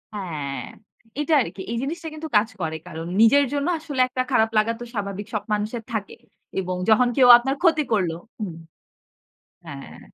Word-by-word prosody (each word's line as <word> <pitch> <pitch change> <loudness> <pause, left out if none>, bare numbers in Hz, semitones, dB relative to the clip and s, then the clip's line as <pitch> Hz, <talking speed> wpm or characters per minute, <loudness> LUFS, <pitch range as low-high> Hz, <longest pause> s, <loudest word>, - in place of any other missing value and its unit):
হ্যাঁ 150 -8 -4 0.6
এটা 310 +2 0
আরকি 200 - -5
এই 235 - -2
জিনিসটা 325 +3 -4
কিন্তু 315 +1 -6
কাজ 215 +2 +2
করে। 160 -1 -2
কারণ 165 -1 -7 0.2
নিজের 280 +5 +6
জন্য 285 +3 -1
আসলে 290 -5 -2
একটা 255 0 -2
খারাপ 220 0 +3
লাগা 220 +2 +3
তো - - -6
স্বাভাবিক 200 0 -4
সব 210 -1 -2
মানুষের 215 +2 -2
থাকে। 205 -3 -4 0.4
এবং 185 -1 -2
যখন 245 +3 +5
কেউ 255 -2 +6
আপনার 270 +3 -2
ক্ষতি 325 -3 +4
করল। 185 -6 +1 0.3
হুম। 185 -6 -4 1.1
হ্যাঁ। 70 - -9
220 Hz, 165 wpm, -23 LUFS, 190-275 Hz, 1.1 s, নিজের